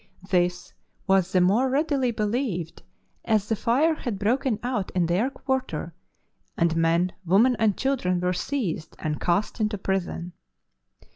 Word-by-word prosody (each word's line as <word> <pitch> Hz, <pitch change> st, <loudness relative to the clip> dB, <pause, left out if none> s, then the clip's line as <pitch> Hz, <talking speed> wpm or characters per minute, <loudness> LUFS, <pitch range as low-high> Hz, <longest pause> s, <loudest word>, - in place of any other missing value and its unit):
This 175 Hz, -1 st, 0 dB, 0.3 s
was 190 Hz, -1 st, +2 dB
the 185 Hz, -, +3 dB
more 215 Hz, +9 st, +3 dB
readily 275 Hz, -2 st, +1 dB
believed 210 Hz, -, -2 dB, 0.4 s
as 215 Hz, -3 st, +1 dB
the 225 Hz, -, +1 dB
fire 275 Hz, +10 st, +2 dB
had 240 Hz, -9 st, -4 dB
broken 230 Hz, +3 st, +1 dB
out 240 Hz, -6 st, -2 dB
in 180 Hz, -2 st, +2 dB
their 185 Hz, +10 st, +1 dB
quarter, 260 Hz, -, -3 dB, 0.6 s
and 165 Hz, -1 st, +2 dB
men, 165 Hz, +2 st, +2 dB
women, 210 Hz, +9 st, +4 dB
and 215 Hz, -3 st, +2 dB
children 240 Hz, -10 st, 0 dB
were 180 Hz, +1 st, 0 dB
seized 185 Hz, -, -3 dB
and 155 Hz, -2 st, -3 dB
cast 180 Hz, +7 st, 0 dB
into 215 Hz, -1 st, 0 dB
prison.' 190 Hz, -2 st, -2 dB
200 Hz, 140 wpm, -25 LUFS, 180-250 Hz, 0.6 s, women